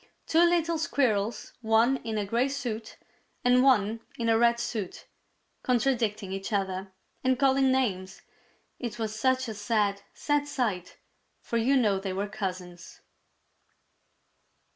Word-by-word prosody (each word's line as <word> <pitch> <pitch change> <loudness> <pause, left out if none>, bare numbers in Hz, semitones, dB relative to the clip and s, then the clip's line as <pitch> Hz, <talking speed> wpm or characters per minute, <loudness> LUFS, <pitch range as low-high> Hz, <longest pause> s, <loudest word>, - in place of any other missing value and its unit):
two 320 - +2
little 340 -1 +2
Squirrels, 235 -9 0
one 225 +4 +3
in 225 -3 -4
a 205 - -1
gray 235 +6 +1
suit 235 -5 -5 0.5
and 250 0 +5
one 230 -4 +3 0.2
in 230 -1 -1
a 225 - +4
red 235 0 +3
suit, 215 -5 -4 0.6
contradicting 230 -6 0
each 195 +2 -5
other 190 -1 -2 0.3
and 260 -1 +2
calling 270 0 +3
names! 195 -8 -1 0.6
It 240 -3 -5
was 220 -2 -3
such 260 +3 +1
a 220 - -4
sad, 205 -1 0
sad 290 -1 -1
sight, 220 -11 -2 0.4
for 235 - -3
you 260 +4 +3
know 210 -6 +2
they 190 -1 -4
were 200 +2 -2
cousins. 185 -4 -6
230 Hz, 135 wpm, -28 LUFS, 200-260 Hz, 0.6 s, and